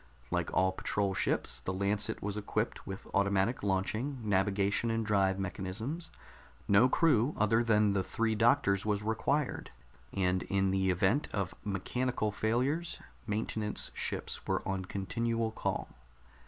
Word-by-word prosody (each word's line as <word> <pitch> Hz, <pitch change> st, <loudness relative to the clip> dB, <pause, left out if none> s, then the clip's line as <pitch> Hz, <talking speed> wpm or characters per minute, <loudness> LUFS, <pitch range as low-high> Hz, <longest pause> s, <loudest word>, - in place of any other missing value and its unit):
Like -, -, 0 dB
all 95 Hz, +1 st, +3 dB
patrol 100 Hz, +1 st, -1 dB
ships, -, -, 0 dB
the -, -, -3 dB
Lancet 100 Hz, +2 st, -1 dB
was 105 Hz, 0 st, -2 dB
equipped 105 Hz, -1 st, -2 dB
with 95 Hz, 0 st, -6 dB
automatic 100 Hz, +3 st, +2 dB
launching, 105 Hz, +8 st, -1 dB
navigation 100 Hz, +2 st, +1 dB
and 115 Hz, 0 st, 0 dB
drive 95 Hz, -2 st, +2 dB
mechanisms; 100 Hz, -, -4 dB, 0.6 s
no 105 Hz, +6 st, +6 dB
crew 145 Hz, -3 st, +3 dB
other 115 Hz, +3 st, +3 dB
than 105 Hz, -3 st, +3 dB
the 100 Hz, -, +2 dB
three 110 Hz, +4 st, 0 dB
doctors 110 Hz, -3 st, +3 dB
was 105 Hz, -1 st, 0 dB
required, 125 Hz, +6 st, 0 dB, 0.4 s
and 90 Hz, -1 st, +1 dB
in 95 Hz, -1 st, +1 dB
the 95 Hz, 0 st, +1 dB
event 95 Hz, -, +2 dB
of 100 Hz, -4 st, -2 dB
mechanical 110 Hz, +3 st, -1 dB
failures, 130 Hz, +11 st, 0 dB, 0.3 s
maintenance 105 Hz, 0 st, -2 dB
ships -, -, -4 dB
were -, -, -1 dB
on 95 Hz, -1 st, -2 dB
continual 115 Hz, +4 st, -1 dB
call. -, -, -2 dB
105 Hz, 135 wpm, -32 LUFS, 95-115 Hz, 0.6 s, no